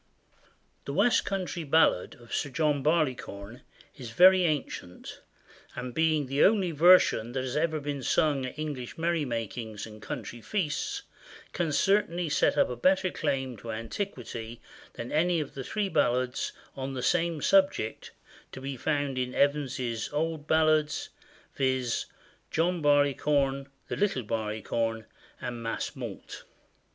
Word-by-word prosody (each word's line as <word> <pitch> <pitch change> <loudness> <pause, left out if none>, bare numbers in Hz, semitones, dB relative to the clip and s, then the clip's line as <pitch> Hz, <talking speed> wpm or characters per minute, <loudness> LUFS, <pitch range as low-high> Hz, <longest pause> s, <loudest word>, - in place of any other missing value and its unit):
[THE 140 - -4
West 245 - +3
country 185 -3 -3
ballad 155 - +3
of 120 -1 -13
Sir 145 - -1
John 150 0 +1
Barleycorn 130 -8 -1 0.3
is 125 -4 -8
very 185 +9 +6
ancient, 145 - -4 0.5
and 125 -1 -5
being 160 -1 +2
the 135 +2 +2
only 195 -4 +4
version 160 -7 +5
that 130 0 -1
has 130 -1 -4
ever 155 0 +1
been 145 -1 -4
sung 135 0 +1
at 130 - -9
English 145 -5 -5
merry 165 -2 0
makings 115 -2 -4
and 110 -1 -12
country 120 +2 -6
feasts, 170 - -2 0.5
can 165 -3 -1
certainly 180 -1 +2
set 145 0 +2
up - - +4
a 125 - -4
better 185 - +2
claim 135 -4 -2
to 115 +2 -7
antiquity 115 - -5 0.3
than 120 +1 -7
any 170 +2 +2
of 150 - -5
the 135 - -5
three 210 - -1
ballads 130 -6 0 0.2
on 135 0 -4
the 125 - -4
same 170 +2 +1
subject 190 - +2 0.4
to - - -8
be 135 +1 -5
found 145 0 -1
in 125 0 -2
Evans's 135 -5 0
Old 155 0 -2
Ballads; 155 -1 +2 0.4
viz., 130 -3 0 0.4
John 170 +1 0
Barleycorn, 145 -1 +2 0.2
The - - -4
Little 200 -11 +1
Barleycorn, 110 +1 -2 0.3
and 120 -1 -5
Mas 115 0 -3
Mault. - - -8
145 Hz, 140 wpm, -28 LUFS, 125-160 Hz, 0.5 s, very